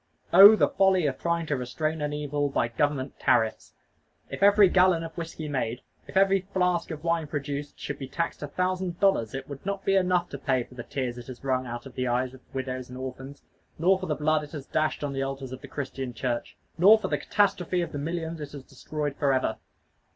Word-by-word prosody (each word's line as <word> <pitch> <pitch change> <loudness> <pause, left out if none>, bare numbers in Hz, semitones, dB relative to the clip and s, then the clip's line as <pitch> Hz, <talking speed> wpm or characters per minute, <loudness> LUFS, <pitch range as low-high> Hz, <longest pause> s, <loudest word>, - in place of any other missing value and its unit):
Oh, 200 +4 +11
the - - +3
folly 190 -3 +3
of 135 -2 -1
trying 170 -1 0
to 150 - -1
restrain 155 +5 -2
an 150 0 -1
evil 145 -1 -1
by 120 -3 0
government 140 +2 -1
tariffs! 110 -1 +1 0.6
If - - -6
every 205 0 +7
gallon 180 -2 +4
of 165 -1 -8
whiskey 165 -2 -6
made, 125 -4 -2 0.3
if - - -4
every 195 0 +4
flask 180 -2 +1
of 155 -1 -6
wine 165 -2 0
produced, 145 0 -5
should 140 - -5
be 135 - -5
taxed 165 +5 -3
a 145 - -4
thousand 185 +2 -2
dollars, 165 - +2
it 135 0 -5
would 140 -1 -9
not 200 0 -4
be 195 - +3
enough 180 -2 +2
to 140 - -7
pay 130 -3 +1
for 125 - -17
the 125 - -7
tears 125 -1 -4
it 120 - -11
has 130 -1 -10
wrung 130 -1 0
out 120 +1 -6
of 135 - -10
the 130 0 -2
eyes 125 +1 0
of 130 - -14
widows 130 -2 -4
and 125 - -8
orphans, 130 +2 -8 0.3
nor 185 +4 +3
for 185 - -5
the 150 - 0
blood 155 +1 +1
it 145 - -11
has 145 -3 -6
dashed 155 0 -1
on 145 -1 -2
the 135 - -2
altars 135 -1 -4
of 130 - -7
the - - -9
Christian 130 -3 -5
Church, 120 +1 -3 0.2
nor 205 +5 +8
for 215 - -3
the - - -1
catastrophe 185 -3 +1
of 170 - -3
the 145 - -4
millions 165 +1 -4
it 145 -1 -7
has 140 -2 -8
destroyed 145 +2 -5
forever. 130 -6 +1
145 Hz, 225 wpm, -27 LUFS, 130-175 Hz, 0.6 s, Oh